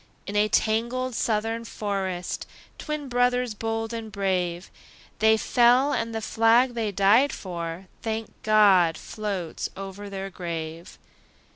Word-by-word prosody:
In 200 - -6
a 210 +1 +4
tangled 235 +4 0
Southern 225 +1 -1
forest, 195 -5 -3 0.3
Twin 300 -2 -4
brothers 245 -1 +1
bold 225 +1 -3
and 225 -2 -5
brave, 185 -3 -1 0.5
They 220 0 +5
fell; 250 +5 +4
and 230 0 -1
the 225 - -2
flag 230 +4 +3
they 225 -3 -1
died 205 +8 +4
for, 170 -1 -6 0.2
Thank 220 0 -3
God! 195 -6 +5
floats 200 -6 -4
over 195 +1 -7
their 195 0 -5
grave. 165 -1 -6
215 Hz, 125 wpm, -25 LUFS, 190-230 Hz, 0.5 s, They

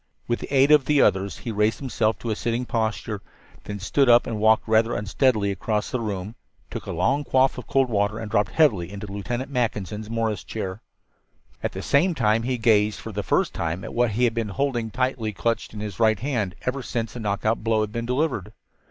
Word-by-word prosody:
With 120 - 0
the - - -8
aid 140 +1 +5
of 150 -3 +6
the 150 0 +3
others 95 -4 +2
he 120 - -5
raised 105 0 +1
himself 115 -5 0
to 115 - -4
a - - 0
sitting 120 +3 -2
posture, 110 -3 -2 0.4
then 100 0 -5
stood 130 +7 +2
up 120 0 +6
and 110 -2 -3
walked 110 +1 +4
rather 110 +1 +3
unsteadily 105 0 +1
across 105 +2 -2
the 125 - -1
room, 105 -2 -4 0.4
took - - -6
a - - -3
long 140 +2 +1
quaff 130 -1 +2
of 125 - -10
cold 135 -1 +2
water 105 -1 0
and 110 -2 -6
dropped 105 -3 +2
heavily 100 - +3
into 100 +1 -6
Lieutenant 120 +7 -4
Mackinson's 110 -4 -2
Morris 110 -5 -1
chair. 95 +3 -5 0.8
At - - -2
the - - -5
same 170 +5 +3
time 110 -3 +2
he 125 +2 -1
gazed 110 -2 +3
for 110 - -7
the 105 0 -3
first - - +1
time 85 +2 -3
at - - -7
what 120 -2 +1
he 120 +4 0
had 120 -2 +3
been 115 -2 -2
holding 120 +1 -1
tightly 125 -2 -1
clutched 115 +4 -1
in 105 - -7
his 105 -4 -6
right 110 -2 +4
hand 115 -9 -2
ever 130 +2 -2
since 115 -3 -3
the 120 - -7
knockout 110 +1 -1
blow 110 -1 +2
had 105 -1 -2
been 115 +1 -4
delivered. 125 - -1
110 Hz, 215 wpm, -24 LUFS, 105-125 Hz, 0.8 s, of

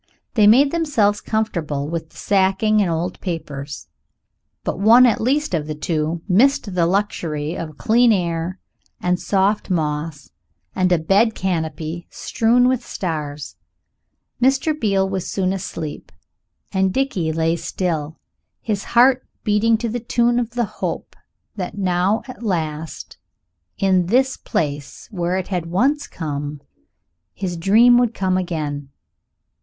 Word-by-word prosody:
They 210 -3 +5
made 270 +6 +6
themselves 240 -12 +1
comfortable 170 -10 -2
with 160 0 -4
the - - -19
sacking 200 +2 +2
and 190 - +1
old 170 +2 -2
papers 145 - -5 0.8
but - - -3
one 230 +5 +7
at 235 - +2
least 280 +2 0
of 155 -3 -1
the 155 - -4
two 155 +2 -2
missed 220 +1 +3
the 170 -2 +2
luxury 170 -5 -1
of 155 -4 -6
clean 235 +2 +4
air 175 -2 -1 0.4
and 180 0 0
soft 200 +2 +1
moss 150 -4 -2 0.4
and 185 -1 +1
a 175 - +5
bed 200 +8 +2
canopy 165 -2 -3
strewn 245 +1 +2
with 255 -1 +1
stars. 150 -5 -5 0.8
Mr. 270 +4 +3
Beale 200 -9 +1
was 190 -2 -3
soon 190 -1 0
asleep 170 -5 -6 0.6
and 190 0 +1
Dickie 195 -9 -1
lay 165 +1 +1
still, 165 -2 -3 0.4
his 205 -3 -2
heart 255 +2 +5 0.2
beating 220 +1 +3
to 235 +1 -3
the 235 +2 -3
tune 240 +1 +1
of 235 0 -4
the 240 -1 +1 0.2
hope - - -3 0.4
that 195 +1 -5
now 185 +2 +1
at 255 - -10
last, 160 -7 -4 0.6
in 185 -3 +2
this 260 +5 +2
place 145 -2 -4
where 180 -2 -1
it 190 - -4
had 180 -4 -2
once 265 - +1
come, 145 -2 -5 0.8
his 185 -3 -3
dream 225 +8 +5
would 240 -2 +1
come 185 -1 0
again. 150 -6 -3
185 Hz, 140 wpm, -20 LUFS, 165-225 Hz, 0.8 s, one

